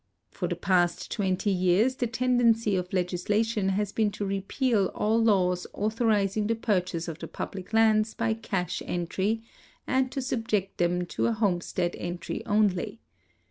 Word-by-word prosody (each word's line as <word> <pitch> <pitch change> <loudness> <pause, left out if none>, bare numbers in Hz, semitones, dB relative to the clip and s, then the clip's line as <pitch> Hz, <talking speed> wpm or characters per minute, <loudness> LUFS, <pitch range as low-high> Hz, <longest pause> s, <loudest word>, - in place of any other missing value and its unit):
For 180 - -3
the 175 - -2
past 175 -1 +1
twenty 195 -1 0
years 190 +8 +2
the 245 - 0
tendency 230 -3 +2
of 180 -1 -2
legislation 195 +3 0
has 200 +1 -1
l)een 215 -2 +1
to 205 - -3
repeal 200 +2 0
all 220 +2 +2
laws 180 -4 +2
authorizing 215 -1 +1
the 230 - +1
purchase 180 -6 -1
of 165 -1 -6
the - - -6
public 190 -1 -6
lands 220 -1 +3
by 230 -1 0
cash 200 -5 -3
entry 190 +6 -1 0.4
and 260 -1 +1
to 275 - -3
subject 225 -6 -2
theni 175 0 +1
to - - -5
liomestead 185 -5 0
entry 175 0 -4
only.' 205 0 +1
205 Hz, 145 wpm, -27 LUFS, 180-225 Hz, 0.4 s, lands